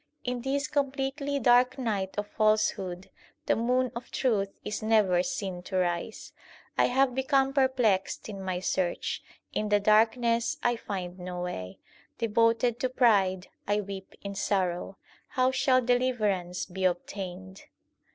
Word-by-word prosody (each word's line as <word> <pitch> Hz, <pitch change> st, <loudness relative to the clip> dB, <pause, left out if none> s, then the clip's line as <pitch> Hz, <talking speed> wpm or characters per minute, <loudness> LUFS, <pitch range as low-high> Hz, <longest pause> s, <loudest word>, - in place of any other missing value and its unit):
In 250 Hz, -1 st, -2 dB
this 280 Hz, +3 st, -1 dB
completely 280 Hz, 0 st, -1 dB
dark 250 Hz, 0 st, +4 dB
night 210 Hz, -7 st, -2 dB
of 205 Hz, -, -1 dB
falsehood 205 Hz, -4 st, 0 dB, 0.3 s
the -, -, +3 dB
moon 250 Hz, +2 st, +1 dB
of 235 Hz, -, -7 dB
truth 210 Hz, -7 st, 0 dB, 0.2 s
is 210 Hz, -, -3 dB
never 210 Hz, -5 st, +3 dB
seen 195 Hz, -6 st, -3 dB
to 185 Hz, +1 st, -4 dB
rise. 175 Hz, +3 st, -2 dB, 0.4 s
I -, -, +4 dB
have 265 Hz, 0 st, +2 dB
become 270 Hz, +1 st, +2 dB
perplexed 250 Hz, -8 st, +1 dB
in 200 Hz, -3 st, -7 dB
my 185 Hz, -1 st, -3 dB
search; 185 Hz, -1 st, -1 dB, 0.3 s
In 215 Hz, -, -1 dB
the 205 Hz, 0 st, +4 dB
darkness 230 Hz, +3 st, +3 dB
I 240 Hz, 0 st, +3 dB
find 185 Hz, -5 st, -5 dB
no 180 Hz, 0 st, -5 dB
way. 95 Hz, -, -5 dB, 0.4 s
Devoted 230 Hz, +1 st, +2 dB
to 255 Hz, -, 0 dB
pride, 195 Hz, -8 st, +2 dB, 0.2 s
I 205 Hz, +1 st, +2 dB
weep 195 Hz, -1 st, -7 dB
in 200 Hz, 0 st, -5 dB
sorrow; 190 Hz, -2 st, -1 dB, 0.3 s
How 255 Hz, -1 st, +1 dB
shall 260 Hz, 0 st, +3 dB
deliverance 215 Hz, -8 st, 0 dB
be 190 Hz, +1 st, -6 dB
obtained 185 Hz, +1 st, -3 dB
215 Hz, 140 wpm, -28 LUFS, 190-250 Hz, 0.4 s, dark